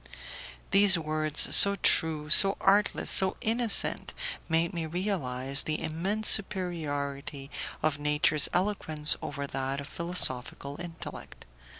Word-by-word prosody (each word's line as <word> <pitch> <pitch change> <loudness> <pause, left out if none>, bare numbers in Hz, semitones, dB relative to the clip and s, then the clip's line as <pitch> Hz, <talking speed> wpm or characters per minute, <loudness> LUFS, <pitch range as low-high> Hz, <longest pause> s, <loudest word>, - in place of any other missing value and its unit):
These 195 -2 +3
words, 155 -1 0
so 200 0 +8
true, 160 -5 0
so 195 +3 +9
artless, 205 +1 -1
so 190 -1 +4
innocent, 230 0 -1 0.3
made 165 +1 -3
me 165 -2 -7
realize 140 -7 -2
the 155 0 -5
immense 195 +7 -5
superiority 145 -8 -2 0.3
of 150 -2 -3
nature's 150 0 0
eloquence 170 -6 -3
over 140 -1 -8
that 135 0 -7
of 140 - -11
philosophical 145 -3 -5
intellect. 170 -2 -12
160 Hz, 110 wpm, -25 LUFS, 145-190 Hz, 0.3 s, so